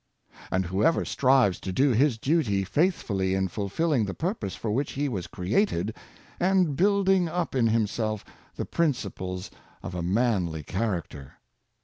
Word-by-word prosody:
And 95 Hz, 0 st, 0 dB
whoever 100 Hz, -, +2 dB
strives 130 Hz, -8 st, +3 dB
to 95 Hz, -, -5 dB
do 135 Hz, +8 st, +3 dB
his 125 Hz, +1 st, +3 dB
duty 115 Hz, -8 st, +1 dB
faithfully 100 Hz, -, 0 dB
is 95 Hz, -2 st, -1 dB
fulfilling 115 Hz, -, 0 dB
the 95 Hz, -, -5 dB
purpose 170 Hz, -, -3 dB
for 110 Hz, -, -3 dB
which 135 Hz, +6 st, -1 dB
he 145 Hz, +1 st, -1 dB
was 95 Hz, -10 st, -3 dB
created, 105 Hz, -, 0 dB, 0.4 s
and 180 Hz, -5 st, +2 dB
building 195 Hz, -1 st, +3 dB
up 175 Hz, +1 st, -2 dB
in 125 Hz, -4 st, +3 dB
himself 110 Hz, -1 st, 0 dB, 0.3 s
the -, -, -3 dB
principles 100 Hz, -, -2 dB, 0.3 s
of -, -, -6 dB
a 90 Hz, -, -3 dB
manly 90 Hz, -5 st, 0 dB
character. 85 Hz, -, -3 dB
110 Hz, 140 wpm, -27 LUFS, 95-150 Hz, 0.4 s, strives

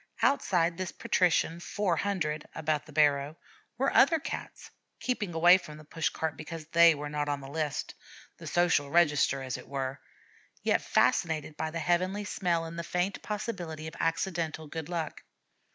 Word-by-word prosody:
Outside 175 Hz, -10 st, +2 dB
this 185 Hz, -1 st, -3 dB
patrician 170 Hz, -2 st, +1 dB
'four 185 Hz, 0 st, -1 dB
hundred' 155 Hz, -5 st, -1 dB
about 155 Hz, -1 st, -1 dB
the -, -, -12 dB
barrow, 145 Hz, 0 st, +2 dB, 0.4 s
were 270 Hz, +3 st, +1 dB
other 325 Hz, +4 st, +6 dB
Cats, 305 Hz, -, -7 dB, 0.3 s
keeping 210 Hz, -9 st, -2 dB
away 175 Hz, +3 st, +7 dB
from 155 Hz, -4 st, -10 dB
the 155 Hz, -, -12 dB
push 160 Hz, +1 st, -1 dB
cart 160 Hz, -1 st, -3 dB
because 155 Hz, 0 st, -7 dB
they 170 Hz, 0 st, +6 dB
were 145 Hz, 0 st, -5 dB
not 145 Hz, 0 st, -2 dB
on 145 Hz, -1 st, -1 dB
the 135 Hz, -, -9 dB
list, 150 Hz, 0 st, -3 dB, 0.4 s
the -, -, -9 dB
Social 175 Hz, -5 st, +2 dB
Register 150 Hz, -4 st, +3 dB
as 130 Hz, -1 st, -3 dB
it -, -, -12 dB
were, 135 Hz, 0 st, -4 dB, 0.6 s
yet -, -, +2 dB
fascinated 155 Hz, -2 st, +1 dB
by 160 Hz, -, -2 dB
the 165 Hz, -, -5 dB
heavenly 185 Hz, +5 st, 0 dB
smell 175 Hz, -4 st, 0 dB
and 165 Hz, +1 st, -7 dB
the -, -, -3 dB
faint 180 Hz, +3 st, -1 dB
possibility 180 Hz, -7 st, -4 dB
of 160 Hz, -, -6 dB
accidental 165 Hz, -1 st, -1 dB
good 160 Hz, +1 st, -6 dB
luck. 165 Hz, -3 st, -3 dB
165 Hz, 170 wpm, -29 LUFS, 150-175 Hz, 0.6 s, away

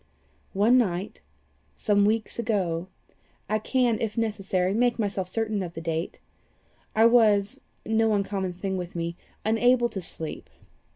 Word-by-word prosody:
"One 225 Hz, +6 st, +4 dB
night, 190 Hz, -4 st, -2 dB, 0.5 s
some 205 Hz, -2 st, +2 dB
weeks 220 Hz, +2 st, 0 dB
ago 185 Hz, -7 st, -1 dB, 0.6 s
I 215 Hz, +2 st, 0 dB
can, 240 Hz, 0 st, +1 dB
if 225 Hz, 0 st, -2 dB
necessary, 195 Hz, -4 st, 0 dB
make 240 Hz, +2 st, +2 dB
myself 200 Hz, -4 st, -2 dB
certain 215 Hz, +1 st, -1 dB
of 175 Hz, -2 st, -6 dB
the -, -, -4 dB
date, 165 Hz, +1 st, -3 dB, 0.8 s
I 220 Hz, +1 st, +5 dB
was 215 Hz, -4 st, +4 dB, 0.2 s
no 220 Hz, -1 st, +2 dB
uncommon 195 Hz, -2 st, -2 dB
thing 190 Hz, +1 st, -3 dB
with 180 Hz, -1 st, -6 dB
me 170 Hz, 0 st, -3 dB, 0.3 s
unable 240 Hz, +2 st, +3 dB
to 195 Hz, -, -5 dB
sleep. 160 Hz, -2 st, -6 dB
205 Hz, 135 wpm, -26 LUFS, 185-225 Hz, 0.8 s, I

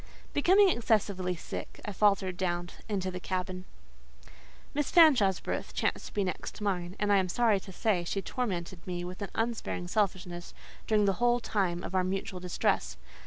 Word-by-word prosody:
Becoming 380 Hz, +7 st, +5 dB
excessively 200 Hz, -, +1 dB
sick, 160 Hz, -, -7 dB
I 205 Hz, -, -3 dB
faltered 195 Hz, -2 st, +2 dB
down 175 Hz, -1 st, -2 dB, 0.2 s
into 190 Hz, -3 st, -1 dB
the 180 Hz, -, -5 dB
cabin. 185 Hz, 0 st, -3 dB, 1.1 s
Miss 295 Hz, 0 st, 0 dB
Fanshawe's 250 Hz, -, +6 dB
berth -, -, -4 dB
chanced -, -, -1 dB
to -, -, -12 dB
be 205 Hz, -, +2 dB
next 185 Hz, +4 st, -4 dB
mine; 185 Hz, -3 st, -2 dB
and, 205 Hz, -1 st, +2 dB
I -, -, +6 dB
am 185 Hz, -1 st, +1 dB
sorry 220 Hz, 0 st, +3 dB
to 190 Hz, -, -11 dB
say, 190 Hz, -2 st, +1 dB
she 185 Hz, +3 st, -2 dB
tormented 185 Hz, -7 st, -4 dB
me 175 Hz, -1 st, -3 dB
with 180 Hz, +3 st, -8 dB
an 200 Hz, -, -3 dB
unsparing 225 Hz, -6 st, -2 dB
selfishness 180 Hz, -3 st, -2 dB, 0.3 s
during 210 Hz, -2 st, +3 dB
the 195 Hz, -, +3 dB
whole 240 Hz, 0 st, +4 dB
time 185 Hz, -6 st, -1 dB
of -, -, -6 dB
our 185 Hz, -1 st, +3 dB
mutual 190 Hz, 0 st, -3 dB
distress. -, -, 0 dB
190 Hz, 170 wpm, -30 LUFS, 180-215 Hz, 1.1 s, Fanshawe's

